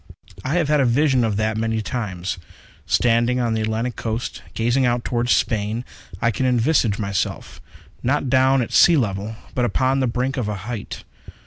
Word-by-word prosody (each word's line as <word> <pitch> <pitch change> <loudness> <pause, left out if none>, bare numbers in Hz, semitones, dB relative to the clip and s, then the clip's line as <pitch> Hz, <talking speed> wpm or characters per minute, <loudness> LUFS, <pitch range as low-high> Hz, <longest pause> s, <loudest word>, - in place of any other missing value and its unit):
I 140 +5 -1
have 170 -4 +2
had 150 0 +3
a 135 - +3
vision 130 0 +3
of 110 -3 0
that 110 0 0
many 110 0 0
times. 95 -6 -4 0.5
Standing 120 +1 +2
on 120 -2 0
the 110 - -1
Atlantic 110 +2 -2
Coast, 115 +3 -4
gazing 120 +4 +1
out 120 -1 +1
toward 120 0 -1
Spain, 110 +2 0 0.3
I 115 +1 +2
can 130 +4 -1
envisage 120 -3 +2
myself, 100 -3 -3 0.4
not 140 +2 0
down 130 0 +3
at - - -6
the - - -3
sea 170 -2 +7
level, 105 -2 -2 0.2
but 125 - 0
upon 130 +2 +1
the 130 - +1
brink 125 +3 -1
of 120 -5 -1
a 105 - -2
height. 115 -3 -6
120 Hz, 185 wpm, -21 LUFS, 110-130 Hz, 0.5 s, sea